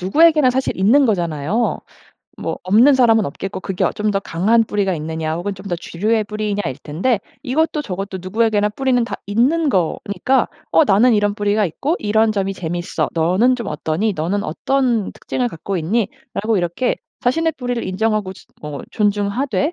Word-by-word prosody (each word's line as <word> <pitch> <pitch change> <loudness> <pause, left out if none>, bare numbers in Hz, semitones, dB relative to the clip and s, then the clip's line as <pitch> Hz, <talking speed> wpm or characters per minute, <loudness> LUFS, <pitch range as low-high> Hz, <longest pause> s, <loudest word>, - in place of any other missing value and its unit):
누구에게나 300 - +4
사실 260 +1 -1
있는 235 +9 +4
거잖아요. 175 +1 0 0.6
뭐 - - -3
없는 225 +10 +5
사람은 225 -4 +4
없겠고 185 +6 -5
그게 190 -1 -4
어 - - +2
좀 210 0 -1
더 195 -1 0
강한 205 +6 +2
뿌리가 200 -3 -1
있느냐. 160 0 -3
혹은 180 +4 -3
좀 190 +1 -12
더 180 - -1
주류의 210 +6 -1
뿌리이냐일 205 -8 -3
텐데 190 +11 0 0.2
이것도 300 +3 0
저것도 195 -4 -5
누구에게나 210 +2 +1
뿌리는 250 +3 +1
다 230 - -5
있는 265 +11 +2
거니까 200 +6 0 0.2
어 - - +5
나는 230 +1 +4
이런 205 -1 +1
뿌리가 205 0 +1
있고 285 - -2
이런 220 +1 +2
점이 195 -2 -1
재미있어. 175 0 -3
너는 185 +10 +2
좀 235 - -5
어떠니? 160 +8 -1
너는 180 +6 -1
어떤 240 - 0
특징을 250 -1 -2
갖고 195 0 -5
있니라고 215 +3 -2
이렇게 175 +8 -1 0.2
자신의 325 +6 +1
뿌리를 245 -2 -3
인정하고 205 0 -1
즛 - - -17 0.2
어 150 -2 -6
존중하되 205 - 0
205 Hz, 380 characters per minute, -19 LUFS, 185-240 Hz, 0.6 s, 없는